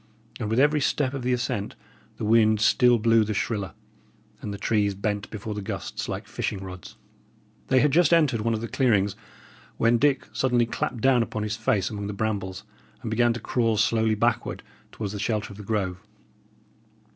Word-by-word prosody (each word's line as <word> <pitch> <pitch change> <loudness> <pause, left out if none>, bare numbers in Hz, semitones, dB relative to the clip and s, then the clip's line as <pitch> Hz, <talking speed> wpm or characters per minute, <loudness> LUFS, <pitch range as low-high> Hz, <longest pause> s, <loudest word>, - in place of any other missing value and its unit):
And 110 -3 -3
with 115 +3 +1
every 150 +2 +3
step 135 0 0
of 135 - -4
the 125 +1 -1
ascent 120 -4 -2 0.4
the - - -3
wind 110 -1 +4
still 120 +3 +4
blew 115 0 +4
the 110 0 -3
shriller, 100 -2 -2 0.7
and 105 - -5
the 100 - -5
trees 100 -1 +1
bent 105 +1 -3
before 110 0 -5
the 105 - -5
gusts 95 - -5
like - - -4
fishing 105 - -3
rods. 95 -2 -9 0.7
They 130 -1 +4
had 150 - +3
just 170 +1 +4
entered 150 -9 +3
one 115 +1 0
of 110 - -4
the 115 - -4
clearings, 105 -6 +1 0.6
when 115 +1 +3
Dick 140 0 +2
suddenly 125 -2 +2
clapped 115 +1 -3
down 130 -1 +4
upon 110 -2 -3
his 105 0 -2
face 105 -3 0
among 100 -1 -4
the 105 - -4
brambles, 100 -3 -3 0.4
and 110 - -4
began 120 +2 +3
to 120 - -5
crawl 115 -1 0
slowly 110 0 +2
backward 115 +2 -1 0.3
towards 105 -2 -5
the 105 - -5
shelter 105 -1 -2
of - - -13
the 105 - -8
grove. 95 -4 -2
110 Hz, 190 wpm, -25 LUFS, 105-120 Hz, 0.7 s, wind